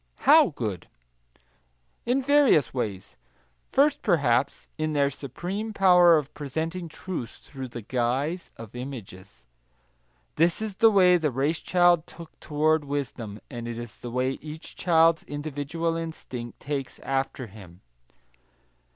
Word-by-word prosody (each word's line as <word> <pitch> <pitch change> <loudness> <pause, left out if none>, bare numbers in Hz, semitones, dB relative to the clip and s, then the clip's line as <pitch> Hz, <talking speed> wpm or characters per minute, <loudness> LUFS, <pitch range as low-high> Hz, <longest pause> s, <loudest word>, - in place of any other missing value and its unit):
How - - +8
good? - - -5 1.2
In 260 +3 +2
various 285 - +4
ways. 105 -7 -4 0.5
First, 285 +1 +3
perhaps, 140 - +1
in 155 0 -2
their 140 -1 +2
supreme 180 - -5
power 180 -4 +6
of 145 -2 -4
presenting 160 +5 -4
truth 165 -7 -6
through 135 -2 -7
the 120 -2 -8
guise 130 - -1
of 115 0 -11
images. 100 - -9 0.9
This 170 +2 +3
is 215 -3 -5
the 225 - +6
way 185 -4 +5
the 160 -3 0
race 140 +5 0
child 175 -2 +3
took 170 -2 -12
toward 155 +1 +1
wisdom, 130 -7 -5
and 120 -3 -7
it 120 -1 -5
is 120 -4 -8
the 120 - -7
way 130 +2 -1
each 155 +1 -9
child's 165 -1 +4
individual 150 +3 -3
instinct 130 -8 -6
takes, 140 -2 -4
after 135 -1 -2
him. 95 -4 -14
145 Hz, 130 wpm, -26 LUFS, 125-170 Hz, 1.2 s, How